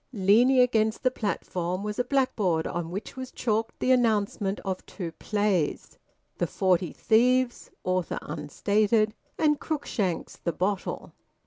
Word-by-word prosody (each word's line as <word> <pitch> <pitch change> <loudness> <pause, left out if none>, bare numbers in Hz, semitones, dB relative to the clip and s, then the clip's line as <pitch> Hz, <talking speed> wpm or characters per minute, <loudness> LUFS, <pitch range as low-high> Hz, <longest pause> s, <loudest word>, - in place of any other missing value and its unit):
Leaning 235 +5 +4
against 220 -2 +2
the 255 - +3
platform 185 -5 -3
was 210 +1 -4
a - - +3
blackboard 240 - +1
on 170 -1 -3
which 195 +4 -6
was 260 -1 -6
chalked 225 -1 -1
the 255 - +2
announcement 210 -5 +1
of 190 -2 -4
two 175 -5 -6
plays: 205 -7 -1 0.4
"The - - +1
Forty 180 -3 +1
Thieves" 245 +2 +2
(author 185 -2 -1
unstated) 205 +8 +1 0.2
and 300 -2 +2
Cruikshank's 210 - -2
"The 170 - -3
Bottle." 190 +1 -2
210 Hz, 130 wpm, -27 LUFS, 185-245 Hz, 0.4 s, Leaning